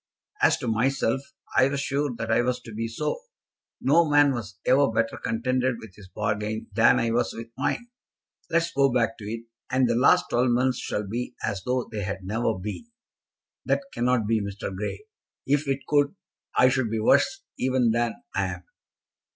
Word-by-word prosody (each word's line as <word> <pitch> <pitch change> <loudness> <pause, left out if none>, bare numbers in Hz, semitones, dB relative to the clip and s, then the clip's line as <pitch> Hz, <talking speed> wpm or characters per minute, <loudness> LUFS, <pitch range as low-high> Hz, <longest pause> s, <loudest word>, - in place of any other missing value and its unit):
As - - +5
to - - -5
myself, 125 +2 +1 0.3
I 130 - +6
was 140 0 -2
sure 140 +1 0
that 115 -1 -3
I 115 - +4
was 125 0 0
to 115 - -10
be 115 +2 -2
so. 150 - -3 0.6
No 160 +4 +4
man 145 -1 +5
was 110 -5 -6
ever 135 +2 +4
better 115 0 0
contented 130 +2 0
with 110 -4 -11
his 100 -1 -14
bargain 105 +2 -3
than 110 +3 +5
I 115 - +1
was 120 +1 +1
with 115 0 -7
mine. 240 - -1 0.6
Let 165 0 +3
us 170 - -4
go 135 -1 +3
back 115 -2 +1
to 105 - -8
it, 115 +2 -5 0.2
and 130 0 +3
the 120 - +2
last 120 +3 +4
twelve 125 +1 +3
months 125 +1 +2
shall 105 -1 -3
be 120 +4 -4
as 100 -2 -2
though 125 0 +1
they 105 -2 -3
had 95 -1 -4
never 110 +3 -1
been." 105 - -6 0.8
"That - - +1
cannot 120 -2 +1
be, 110 0 +1
Mr. 100 -1 -5
Grey. 105 - -5 0.4
If 145 +1 +1
it 135 0 0
could, 145 +2 +2 0.4
I 125 - +7
should 130 -3 0
be 110 0 -1
worse 110 - +3 0.2
even 130 -2 +2
than 115 0 0 0.2
I 100 - +1
am." 90 - -15
120 Hz, 190 wpm, -26 LUFS, 110-130 Hz, 0.8 s, I